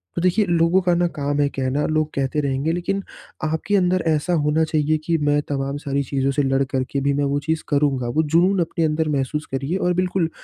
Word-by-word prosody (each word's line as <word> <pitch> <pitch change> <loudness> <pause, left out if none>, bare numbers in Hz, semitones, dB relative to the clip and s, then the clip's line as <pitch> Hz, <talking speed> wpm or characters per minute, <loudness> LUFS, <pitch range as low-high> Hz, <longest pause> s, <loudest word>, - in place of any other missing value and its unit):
तो 170 - -1
देखिए, 185 +4 +2
लोगों 170 +1 +3
का 180 -1 +2
ना 175 0 +2
काम 145 0 -1
है 145 - +3
कहना, 135 +2 -1
लोग 155 0 0
कहते 135 +2 -1
रहेंगे 140 +3 -1
लेकिन 195 +3 -2 0.4
आपके 160 +6 -1
अंदर 185 -1 +2
ऐसा 160 +3 +1
होना 150 0 +2
चाहिए 155 0 +1
कि 165 0 +1
मैं 145 -1 +1
तमाम 140 0 -2
सारी 140 -1 -2
चीज़ों 135 +1 -1
से 145 +1 0
लड़ 135 0 +2
करके 135 +1 -2
भी 140 +1 +1
मैं 145 +1 0
वो 140 +1 0
चीज़ 160 +2 -2
करूँगा, 140 -4 +1
वो 155 +7 +1
जुनून 175 +5 +2
अपने 165 0 -1
अंदर 155 0 0
महसूस 145 +2 -1
करिए। 135 +7 -2
और 180 -2 +1
बिल्कुल 180 -1 0
150 Hz, 220 wpm, -21 LUFS, 140-170 Hz, 0.4 s, लोगों